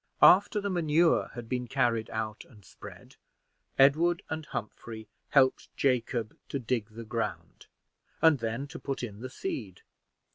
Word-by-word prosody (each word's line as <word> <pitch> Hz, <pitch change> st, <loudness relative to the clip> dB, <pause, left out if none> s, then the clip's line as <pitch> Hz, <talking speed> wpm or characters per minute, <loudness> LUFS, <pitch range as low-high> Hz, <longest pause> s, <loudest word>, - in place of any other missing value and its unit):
After 205 Hz, +3 st, +7 dB
the 200 Hz, -1 st, -2 dB
manure 170 Hz, -1 st, +3 dB
had 120 Hz, -2 st, -7 dB
been 125 Hz, 0 st, -2 dB
carried 120 Hz, -3 st, +1 dB
out 110 Hz, -1 st, -4 dB
and 105 Hz, -7 st, -18 dB
spread, -, -, -13 dB, 0.6 s
Edward 160 Hz, +6 st, +4 dB
and 160 Hz, -1 st, -4 dB
Humphrey 110 Hz, 0 st, -6 dB, 0.2 s
helped 130 Hz, -2 st, +3 dB
Jacob 120 Hz, -4 st, 0 dB
to -, -, -2 dB
dig 115 Hz, -3 st, -2 dB
the 115 Hz, +1 st, -9 dB
ground, 115 Hz, +1 st, -4 dB, 0.5 s
and 160 Hz, -4 st, +5 dB
then 115 Hz, +4 st, -3 dB
to -, -, -8 dB
put 135 Hz, -2 st, -4 dB
in 105 Hz, -4 st, -6 dB
the 130 Hz, +2 st, -6 dB
seed. 100 Hz, -7 st, -5 dB
125 Hz, 145 wpm, -29 LUFS, 110-150 Hz, 0.6 s, After